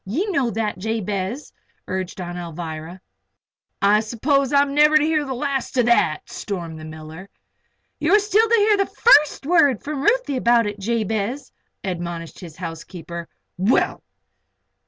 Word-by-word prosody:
Ye 265 - -2
know 275 -9 +1
that, 215 -5 -3
Jabez," 210 +3 -3 0.3
urged 185 0 -4
Aunt 175 -1 -5
Alvirah. 165 0 -7 0.8
"I 205 +1 +5
s'pose 260 +5 0
I'm 280 -1 +3
never 300 +1 +5
to 305 - +2
hear 310 -1 +1
the 265 -1 -4
last 270 0 -3
of 245 - +4
that!" 235 -10 +2
stormed 170 -6 -6
the 155 - -9
miller. 155 +4 -10 0.7
"You 315 +6 +3
are - - +6
still 425 +2 +2
to 465 - +5
hear 420 -1 +4
the 395 - +1
first 300 - +4
word 290 - +3
from 290 -2 -4
Ruthie 425 - +1
about 235 -2 +3
it, 205 0 -4
Jabez," 220 +4 -2 0.3
admonished 170 -3 -5
his 165 -4 -10
housekeeper. 170 0 -7 0.3
"Well!" 200 +7 +1
225 Hz, 150 wpm, -22 LUFS, 180-285 Hz, 0.8 s, are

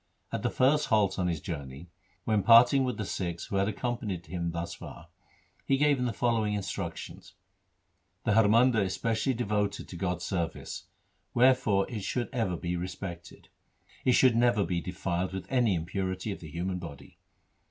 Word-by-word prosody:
At - - -2
the - - 0
first 145 +4 +3
halt 100 -5 +2
on 90 - +1
his 85 -3 -1
journey, 70 +1 -7 0.3
when 110 -2 +2
parting 120 +6 +7
with 125 -4 -2
the 105 - -3
Sikhs 85 -3 -3
who 100 - -2
had 100 0 +2
accompanied 110 -6 -3
him 85 +1 -3
thus 85 0 -4
far, - - -11 0.5
he 135 - +2
gave 145 0 +3
them 125 -1 0
the - - -1
following 110 -3 +1
injunctions: 100 -2 -6 0.3
— 95 -1 -47
' 90 +2 -46
The 110 - +3
Har 110 0 +5
Mandar 115 +1 +4
is 95 -1 -1
specially 115 +3 0
devoted 105 -3 -1
to - - -9
God's 90 0 -2
service, 85 -4 -3 0.5
wherefore 125 -6 +4
it 110 -5 -5
should 120 +5 -2
ever 110 -8 0
be 90 +1 -3
respected. 85 -1 -7 0.5
It 125 - +4
should 125 -2 +5
never 120 -3 +3
be 85 0 -1
defiled 90 +1 -3
with 95 - -5
any 120 -7 +3
impurity 95 +4 -3
of 95 - -6
the 80 - -10
human 90 +3 -3
body. 80 -5 -10
100 Hz, 180 wpm, -29 LUFS, 90-115 Hz, 0.5 s, parting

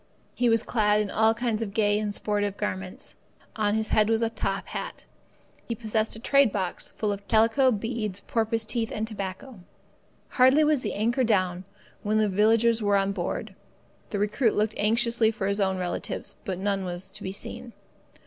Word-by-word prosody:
He 245 -1 +1
was 230 0 +3
clad 210 -2 +2
in 210 -1 -1
all 220 +1 +3
kinds 230 -2 -1
of 205 -2 -4
gay 210 -1 +2
and 210 -1 -2
sportive 205 -1 -1
garments. 190 -3 -5 0.4
On 210 -1 +1
his 220 0 -1
head 215 0 +3
was 225 0 +2
a 225 - 0
top - - -3
hat. - - -6 0.6
He 230 - -2
possessed 220 -1 -1
a - - -9
trade 275 0 +4
box 190 -3 -2
full 210 -2 0
of 200 0 -6
calico, 230 +5 +4
beads, 215 -3 -2
porpoise 225 0 -1
teeth, 230 0 -1
and 215 - -2
tobacco. 200 +2 -6 0.7
Hardly 260 +4 +5
was 300 -3 +2
the - - -3
anchor 235 +5 +1
down, 185 -5 +1 0.4
when 215 +1 0
the 215 -1 +3
villagers 225 +3 +3
were 205 -1 +3
on 195 0 +1
board. 180 -3 -4 0.6
The 205 - -3
recruit 210 +4 +1
looked 215 +1 +1
anxiously 230 +1 +2
for 215 -3 -3
his 200 +1 0
own 190 -1 +1
relatives, 180 -1 -4
but 190 -2 -3
none 195 0 -1
was 180 +1 -6
to 205 +2 -11
be 190 - -4
seen. 225 +4 -7
215 Hz, 185 wpm, -26 LUFS, 200-230 Hz, 0.7 s, Hardly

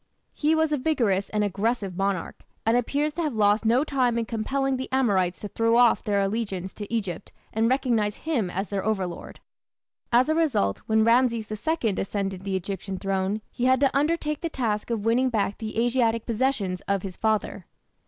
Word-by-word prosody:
He 310 +1 +2
was 315 -1 +2
a 295 - +1
vigorous 230 -10 +1
and 210 -1 0
aggressive 205 -1 -1
monarch, 195 -2 -2 0.2
and 225 +1 +3
appears 285 +5 0
to 340 - -3
have 300 -7 -1
lost 210 +1 +3
no 240 +5 +4
time 255 -5 +1
in 230 - 0
compelling 265 +4 -1
the 260 - -5
Amorites 195 -9 +1
to 210 - -4
throw 230 +2 +2
off 240 -1 +4
their 205 -1 +1
allegiance 195 -3 -2
to 205 0 -8
Egypt 200 -7 -3 0.2
and 225 +1 +2
recognize 235 -6 +1
him 260 - -1
as 195 +3 -3
their 200 -2 -2
overlord. 190 -5 -3 0.7
As 245 +2 +4
a 315 - +2
result, 285 - +1
when 220 0 +3
Rameses 230 -2 +2
II 225 +1 -1
ascended 195 -1 -3
the 195 -1 -1
Egyptian 190 +1 -4
throne 195 +2 -1
he 245 - -2
had 260 0 +4
to 275 -2 +3
undertake 300 +1 0
the 335 - -2
task 225 -8 -2
of 225 -3 -2
winning 250 +3 +3
back 205 -4 -1
the 220 -1 -5
Asiatic 230 -2 +1
possessions 225 -6 -1
of 200 -1 0
his 190 -2 -6
father. 215 -4 -1
225 Hz, 185 wpm, -25 LUFS, 200-255 Hz, 0.7 s, no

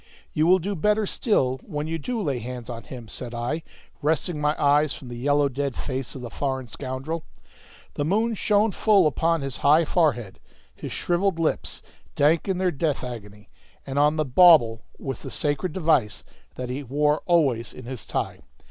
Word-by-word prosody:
"You 155 +2 +2
will 185 +1 +6
do 190 +3 -3
better 210 +5 +1
still 135 - +1
when 150 0 -4
you 165 +1 -3
do 235 - -3
lay 140 - -1
hands 120 +1 -6
on 115 -1 -8
him," 120 -4 -9
said 120 +2 -6
I, 120 +7 -2 0.4
wresting 155 +1 0
my 150 +1 +1
eyes 145 0 +3
from 130 - -10
the 120 - -6
yellow 145 +3 +2
dead 140 0 -3
face 130 -1 -4
of 130 - -7
the 120 - -7
foreign 130 -2 -2
scoundrel. 135 +7 -4 0.7
The 145 - -2
moon 220 +9 +1
shone 210 +1 +2
full 200 -2 +4
upon 165 +2 +1
his 135 -2 -2
high 155 +3 +4
forehead, 140 - 0 0.3
his - - -8
shrivelled 175 0 0
lips, 165 -2 -1 0.3
dank 155 +5 +3
in 190 -2 0
their 185 -1 +1
death 150 -1 -1
agony, 105 -5 -8 0.4
and 135 +1 -2
on 150 +1 +4
the 155 -1 0
bauble 130 -6 +6 0.2
with 135 -3 -5
the - - -7
sacred 145 +4 -1
device 150 - +1 0.3
that 125 -1 -5
he 135 +3 -3
wore 150 +3 +1
always 140 -10 +2
in 130 - -11
his 130 -1 -6
tie. - - -3
145 Hz, 185 wpm, -25 LUFS, 130-165 Hz, 0.7 s, will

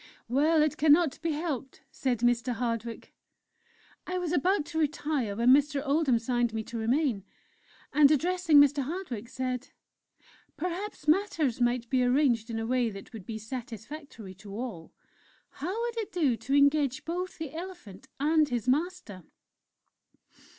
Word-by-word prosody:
"'Well, 300 +6 +3
it 305 0 0
cannot 310 -1 +4
be 330 -1 0
helped,' 290 -4 -4
said 245 -4 -1
Mr. 245 +1 +2
Hardwick. 230 -1 -4 0.9
"I 365 - -2
was 355 -3 -2
about 355 +1 +2
to 320 0 -4
retire 290 -7 -1
when 235 +3 +4
Mr. 290 +1 +3
Oldham 280 -3 +2
signed 240 +1 0
to 225 - -9
me 220 - -2
to 230 +2 -7
remain, 240 -2 +1 0.7
and 285 0 +6
addressing 330 +1 +4
Mr. 285 0 +5
Hardwick, 265 - -5
said: 255 0 -3 0.9
"'Perhaps 360 0 -5
matters 310 - +1
might 240 0 +1
be 255 -1 +3
arranged 245 -3 +2
in 225 - -3
a 225 - -2
way 245 0 +1
that 195 +2 -10
would 215 -5 -9
be 225 - -4
satisfactory 230 0 -8
to 195 +2 -11
all. 220 -9 -6 0.6
How 365 +10 -4
would 475 -1 -3
it 435 - -4
do 300 -9 +2
to 230 +5 -2
engage 285 -2 +3
both 360 +3 -4
the 315 -3 -6
elephant 330 - -9
and 305 +1 +3
his 240 -2 -2
master?" 285 - -1
275 Hz, 150 wpm, -29 LUFS, 235-315 Hz, 0.9 s, and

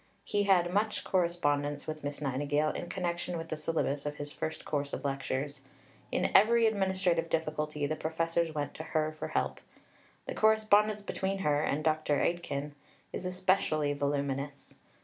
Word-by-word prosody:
He 205 -1 0
had 180 -3 +4
much 210 +2 +1
correspondence 145 -5 0
with 155 -1 -5
Miss 145 +1 -4
Nightingale 145 +2 +1
in 175 - -5
connection 175 -1 -2
with 165 0 -6
the - - -1
syllabus 155 -2 -1
of 145 - -3
his 145 0 -7
first 160 - -4
course 145 -1 -2
of - - -4
lectures. 135 +1 -2 0.5
In - - +1
every 230 +3 +6
administrative 190 -5 +1
difficulty 150 -2 -1
the 155 +2 -1
professors 165 +1 0
went 145 -2 -3
to 160 - -6
her 155 -1 0
for - - -3
help. - - -1 0.7
The - - -4
correspondence 215 -1 +4
between 195 -1 -2
her 145 -1 +3
and 155 0 0
Dr. 155 -1 +2
Aitken 150 -4 -1 0.4
is 185 - -3
especially 180 -5 +1
voluminous. 140 0 -2
155 Hz, 155 wpm, -31 LUFS, 145-180 Hz, 0.7 s, every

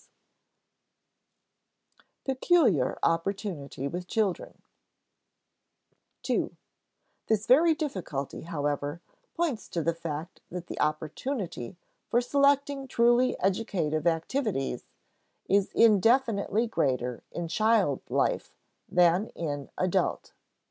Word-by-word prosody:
[Sidenote: - - -34
Peculiar 265 - +2
opportunity 165 - -1
with 180 +4 -5
children] 200 -3 -2 1.6
(ii) - - -1 0.7
This 220 -1 +1
very 315 +6 +5
difficulty, 185 - -4
however, 145 -1 -2 0.4
points 300 - -1
to 170 - -2
the 170 - +1
fact 165 0 -6
that 175 0 -6
the - - -7
opportunity 155 - -3 0.3
for 240 - +3
selecting 280 +1 +2
truly 240 +1 +3
educative 180 -6 0
activities 165 - -1 0.6
is 200 0 +3
indefinitely 225 0 +4
greater 125 - -1
in 175 -1 -4
child 210 - +2
life - - 0 0.3
than 180 +4 +4
in 145 -4 -4
adult. 185 +1 0
185 Hz, 90 wpm, -28 LUFS, 155-235 Hz, 1.6 s, very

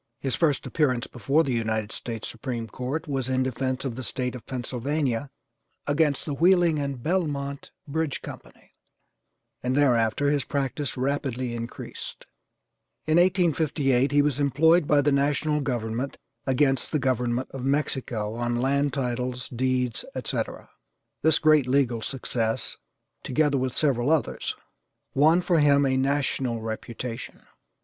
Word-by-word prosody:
His 135 -2 -2
first 150 -5 +1
appearance 130 -6 +1
before 140 +6 +1
the 135 - -1
United 110 -2 -1
States 115 -2 -5
Supreme 120 -1 -4
Court 130 +9 -4
was 135 -3 -2
in 130 0 +2
defence 130 +1 -2
of 125 -4 -3
the 130 - -5
State 125 0 -3
of 125 - -10
Pennsylvania 130 +1 -2 0.6
against 145 -1 +1
the 150 - -2
Wheeling 170 0 +4
and 140 -4 -3
Belmont 145 -5 -1 0.2
Bridge 155 0 -2
Company, - - -11 0.9
and 130 +2 0
thereafter 125 0 +3
his 145 -2 +1
practice 140 -1 -2
rapidly 130 -2 -1
increased. 115 0 -7 0.8
In 155 +1 +3
1858 155 -7 +2
he 145 0 +4
was 145 -2 0
employed 160 +3 +4
by 145 -1 +5
the 145 +1 +2
national 145 +2 +1
government 120 0 -2 0.3
as 130 - +3
against 135 0 +2
the 155 - +2
government 125 -2 0
of 135 -2 -6
Mexico 130 -6 -1
on 120 +1 -1
land 140 +3 +1
titles, 125 -1 -2
deeds, 125 -1 0
etc. - - -3 0.5
This 160 0 +4
great 155 -4 +4
legal 125 -3 +2
success, 115 -3 -2 0.5
together 145 0 +1
with 130 -1 -2
several 135 -4 +2
others, 160 -2 0 0.6
won 160 +6 +5
for 175 -2 +2
him 140 -1 +5
a 130 -1 +2
national 130 -3 0
reputation. 115 +1 -6
135 Hz, 140 wpm, -26 LUFS, 125-145 Hz, 0.9 s, by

